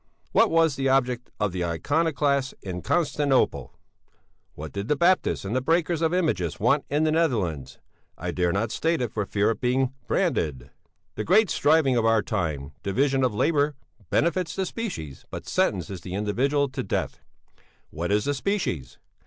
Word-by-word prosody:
"'What 225 - +4
was 165 -3 +3
the 135 0 +1
object 125 -2 +1
of 105 -2 0
the 90 0 -2
iconoclasts 140 - 0
in 90 -2 -5
Constantinople? 145 - +1 0.8
What 80 +1 -7
did 100 +1 -4
the 150 - +2
baptists 175 - +2
and 125 +6 -1
breakers 165 +2 +1
of 160 -1 +2
images 155 - 0
want 130 +7 +2
in 150 +2 +1
the 155 - +2
Netherlands? 95 - 0 0.4
I - - -3
dare 90 -1 +1
not 105 +4 -1
state 165 +1 0
it 120 -4 -3
for 105 -3 -2
fear 105 +2 +1
of - - -5
being 130 +1 +1
branded. 80 - -1 0.4
"'The 105 - -4
great 210 +4 +4
striving 145 -4 +3
of 115 - +2
our 115 -1 +3
time: 80 - -2
division 135 +7 +1
of 125 -5 +1
labour 145 +3 +2 0.3
benefits 170 0 +1
the 190 - -1
species 180 - -6
but - - -7
sentences 90 0 -1
the 90 +1 -6
individual 135 +8 +1
to 130 - -4
death. - - -3 0.7
What 85 +4 -3
is 105 +1 +2
the 145 - +1
species? 135 - -2
130 Hz, 165 wpm, -25 LUFS, 100-155 Hz, 0.8 s, What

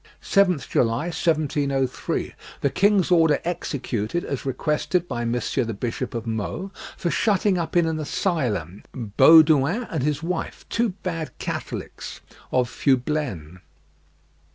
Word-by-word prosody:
"7th 180 - +2
July, 125 +9 0
1703, 140 -5 0 0.3
the 140 - +1
king's 200 -2 +3
order 160 -4 +5
executed 145 - -2
as 140 -1 -4
requested 155 +6 0
by 120 -6 -3
Monsieur 120 +2 0
the 115 -2 -4
Bishop 120 +3 -4
of 115 -1 -3
Meaux, 115 - -3 0.3
for 170 - -1
shutting 200 -3 +2
up 170 +1 -1
in 170 - +4
an 160 -1 -1
asylum 125 - -1
Baudouin 150 - +5
and 160 -5 -1
his 150 +2 -1
wife, 170 0 -4
two 235 0 +1
bad 165 -4 -4
Catholics - - -5 0.3
of 125 -1 +2
Fublaines." 125 - -1
150 Hz, 125 wpm, -24 LUFS, 125-170 Hz, 0.3 s, order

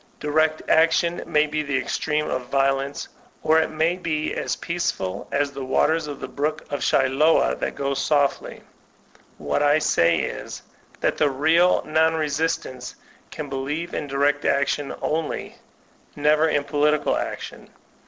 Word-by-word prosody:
Direct 155 +1 0
action 165 +2 +3
may 150 -2 +3
be 155 0 -2
the 140 -2 -1
extreme 150 +2 -1
of 125 -1 -3
violence, 135 +1 0 0.4
or 160 +1 +4
it 160 - 0
may 160 +3 0
be 155 -4 -2
as - - -2
peaceful 100 - -3
as 140 0 0
the 135 -1 -6
waters 155 +4 +1
of 145 -2 -6
the - - -5
Brook 155 +2 -2
of 145 - -2
Siloa 135 +4 +3
that - - -3
go 140 0 -1
softly. 145 0 0 0.7
What - - -1
I 145 +1 +4
say 85 - +3
is, - - -6 0.4
that - - +1
the 150 - +4
real 160 +6 +3
non 160 +1 +2
resistants 145 -4 -2 0.3
can 150 -2 -6
believe 140 +5 -4
in - - -3
direct 145 +1 +1
action 140 0 0
only, 160 0 -3 0.6
never 150 +2 +3
in 145 -2 +1
political 150 +1 +1
action. - - -6
150 Hz, 145 wpm, -23 LUFS, 140-160 Hz, 0.7 s, or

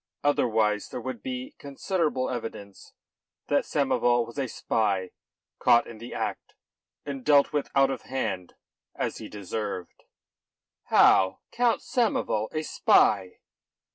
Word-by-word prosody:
Otherwise 110 -7 +1
there - - -5
would 125 -2 -6
be 130 +1 -5
considerable 145 -1 -1
evidence 110 -5 -7 0.6
that - - +2
Samoval 120 -1 +2
was 120 +4 -8
a 135 - -1
spy 100 -6 -1 0.5
caught 120 - +5
in 115 -2 -11
the 120 +2 -9
act - - -4 0.5
and 140 -3 -5
dealt 145 0 +4
with 145 -1 -1
out 135 0 +4
of - - -4
hand 100 -9 -4 0.4
as - - -3
he - - -8
deserved." 100 -2 -6 0.8
"How? 95 0 +4
Count 240 -1 +1
Samoval 225 - 0
a 155 0 -2
spy?" 95 -10 +2
120 Hz, 125 wpm, -27 LUFS, 105-140 Hz, 0.8 s, caught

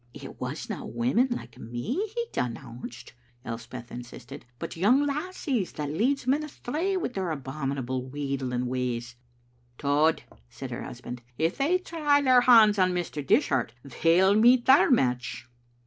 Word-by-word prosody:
"It - - -10
wasna - - -4
women 125 - +1
like 120 - -6
me 120 - -4 0.2
he 470 0 -1
denounced," 120 0 -5 0.3
Elspeth 115 +1 -7
insisted, 120 0 -10
"but - - -6
young 240 - +3
lassies 290 - -2
that 145 -2 -4
leads 250 - 0
men 275 +4 +2
astray 310 +6 -2
wi' 365 - -2
their 190 -7 -3
abominable 135 -3 -3
wheedling 135 -3 -2
ways. 125 -1 -3 0.2
" 120 0 -38
" 120 0 -37
Tod," 150 +3 +2 0.3
said - - -8
her - - -5
husband, 125 0 -8
" 120 - -37
if 165 +3 +1
they 315 +7 +3
try 310 -5 +1
their 255 -3 +5
hands 220 -4 +6
on 185 -1 +3
Mr. 175 -4 -3
Dishart 125 -3 +2 0.3
they'll 180 +4 +5
meet 240 +3 +5
their 265 +2 +6
match." 125 - 0
155 Hz, 150 wpm, -27 LUFS, -, 0.3 s, hands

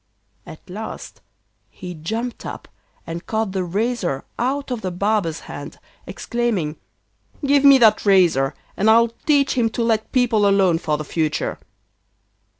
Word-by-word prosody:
At 160 - -12
last 210 +4 -8 0.5
he 180 -1 -8
jumped 225 +10 -4
up, - - -7 0.4
and 165 +1 -7
caught 220 -2 -1
the 190 -1 -1
razor 195 - -2 0.2
out 270 +2 -1
of 240 -3 -3
the 185 - -2
barber's 180 -3 -1
hand, 145 +1 -9 0.3
exclaiming: 215 -11 -2 0.7
'Give 280 0 +3
me 280 -1 +8
that 220 -4 +4
razor, 175 -9 +3 0.2
and 210 +3 +2
I'll 230 +1 +5
teach 280 +4 +1
him 235 -3 +1
to 235 - +1
let 220 -1 0
people 230 -5 +3
alone 190 -4 +3
for 150 -2 -1
the 155 - -6
future. 155 0 -2
210 Hz, 145 wpm, -21 LUFS, 170-235 Hz, 0.7 s, me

